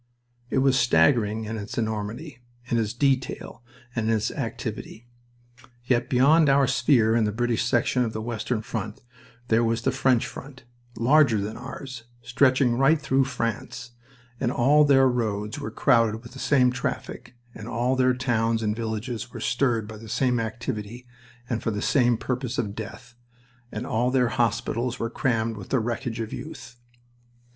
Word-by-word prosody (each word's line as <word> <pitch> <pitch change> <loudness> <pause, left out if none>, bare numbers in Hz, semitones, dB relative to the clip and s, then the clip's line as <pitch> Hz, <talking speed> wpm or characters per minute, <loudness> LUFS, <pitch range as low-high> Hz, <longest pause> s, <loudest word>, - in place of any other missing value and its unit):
It - - -1
was 135 -1 +4
staggering 110 +1 +3
in 110 +1 -4
its 105 -1 -7
enormity, 110 +5 -4 0.3
in 120 -1 0
its 105 -2 -1
detail, 130 -1 -1 0.3
and 110 -2 0
in 115 - +3
its 110 - -1
activity. 110 +2 -5 0.8
Yet 125 0 +1
beyond 145 +4 +5
our 140 0 +4
sphere 120 -3 +3
in 115 -2 +3
the 105 - 0
British 120 +1 0
section 120 +2 +2
of 115 - -2
the 110 - -5
western 115 0 -3
front 110 -1 -5 0.5
there 115 +1 +3
was 115 0 0
the 130 - +2
French 130 -2 +2
front, 135 0 -10 0.3
larger 125 -1 +4
than 105 +2 -4
ours, 130 -2 -8 0.2
stretching 130 -1 +2
right 150 +4 +4
through 135 -2 +1
France, 120 -1 -4 0.5
and 120 -2 0
all 145 +5 +4
their 135 -2 +5
roads 105 -4 -2
were - - -4
crowded 115 0 +2
with 120 - -12
the 135 - -11
same 130 -3 +3
traffic, 125 0 -5 0.2
and 110 +1 -9
all 125 +2 0
their 130 -1 +3
towns 115 -3 0
and 105 -1 0
villages 115 +2 -4
were - - -8
stirred 120 -4 0
by 110 0 -9
the 110 +1 -11
same 125 +1 +1
activity 115 0 -5 0.4
and 120 -2 -2
for - - -1
the 105 -2 -2
same 120 0 +2
purpose 130 +1 -3
of 100 -6 -2
death, 110 +3 -9 0.6
and 110 +3 -5
all 120 0 0
their 125 -2 +2
hospitals 115 +2 -1
were 115 -1 -3
crammed 115 -5 0
with 100 - -9
the 130 - +2
wreckage 115 0 -3
of 115 -1 -4
youth. 135 -6 -9
120 Hz, 170 wpm, -25 LUFS, 110-130 Hz, 0.8 s, beyond